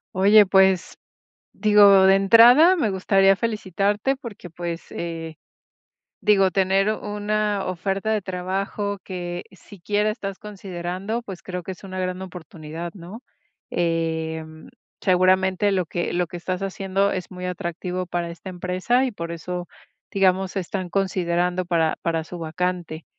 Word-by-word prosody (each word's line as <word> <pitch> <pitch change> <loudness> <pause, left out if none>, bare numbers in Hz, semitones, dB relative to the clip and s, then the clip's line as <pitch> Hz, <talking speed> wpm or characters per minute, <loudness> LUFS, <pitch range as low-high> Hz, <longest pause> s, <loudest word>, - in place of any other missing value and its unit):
Oye, 205 +2 +6
pues, 190 -1 +3 0.6
digo, 200 -2 +6
de 190 - +6
entrada, 240 - +7
me 265 -10 +1
gustaría 195 0 +3
felicitarte 210 +2 -1
porque, 225 -8 -10
pues, 170 0 -6
eh, 165 -2 -6 0.9
digo, 195 -3 +4
tener 195 +2 +2
una 210 -1 -2
oferta 195 +4 -2
de 215 -2 +1
trabajo 195 +2 -3
que 175 -2 -5
siquiera 205 +2 -2
estás 195 -3 -6
considerando, 195 +2 -5
pues, 190 -5 -8
creo 180 -1 -6
que 190 - -5
es 185 - -11
una 185 -1 -6
gran 185 0 -3
oportunidad, 165 -2 -8
¿no? 200 +6 -10 0.5
Em, 160 -2 -2 0.3
seguramente 185 +2 +3
lo 185 -4 0
que 175 - -3
lo 175 -1 0
que 175 - -7
estás 185 +2 -4
haciendo 195 0 0
es 185 0 -5
muy 180 0 -7
atractivo 180 +1 -4
para 175 -1 -3
esta 170 +3 -9
empresa, 185 +9 0
y 255 - -2
por 170 -4 -6
eso, 175 +1 -5 0.4
digamos, 190 0 +1
están 185 -1 -3
considerando 180 -1 0
para 165 -2 +1
para 165 -1 0
su 175 +2 -9
vacante, 170 0 -3
185 Hz, 135 wpm, -23 LUFS, 175-200 Hz, 0.9 s, entrada